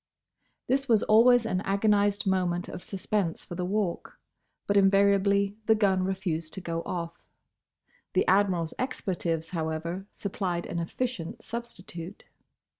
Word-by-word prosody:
This 270 0 0
was 220 -2 +4
always 235 +2 +6
an 185 -4 0
agonised 205 0 +2
moment 180 -2 0
of - - -7
suspense 195 -3 -2
for - - -8
the 180 +1 -3
Walk. 200 -3 -2 0.5
But 205 - 0
invariably 200 0 +4
the 220 - +6
gun 195 -3 +2
refused 175 -4 -2
to - - -4
go 165 -2 -3
off. 170 -1 -4 0.9
The 185 - +3
Admiral's 185 -4 +2
expletives, 175 -10 -2
however, 165 +3 -3
supplied 185 -3 -3
an 170 - -3
efficient 175 0 -4
substitute. 200 -6 -7
190 Hz, 125 wpm, -28 LUFS, 175-205 Hz, 0.9 s, always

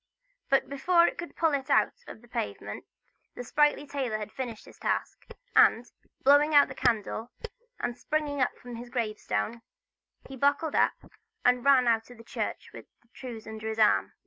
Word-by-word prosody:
But 270 - +3
before 340 +5 +3
it - - -2
could 345 - -7
pull 325 -2 +2
it 270 -2 -2
out - - +3
of 220 - -11
the - - -17
pavement, 105 - -5 0.5
the 245 - -6
sprightly 295 +3 +2
tailor 270 -6 -2
had 215 0 -7
finished 245 -5 -6
his - - -16
task; - - -3 0.3
and, 235 +2 +5 0.4
blowing 290 +2 +5
out 285 - +7
his - - -9
candle, 225 +1 0 0.5
and 245 - -2
springing 290 -1 -1 0.2
from 245 - -11
off 235 - -6
his 240 +1 -9
grave 220 -4 -2
stone, 230 +2 -2 0.7
he 270 - -9
buckled 285 +4 +1
up, - - +3 0.5
and 250 -1 +3
ran 270 -3 +5
out 225 -1 +1
of 245 - -13
the 230 - -13
church - - -5
with - - -11 0.2
the 235 - -34
trews 240 -3 -9
under 220 0 -7
his 220 - -4
arm. 215 -1 +3
245 Hz, 185 wpm, -28 LUFS, 225-285 Hz, 0.7 s, out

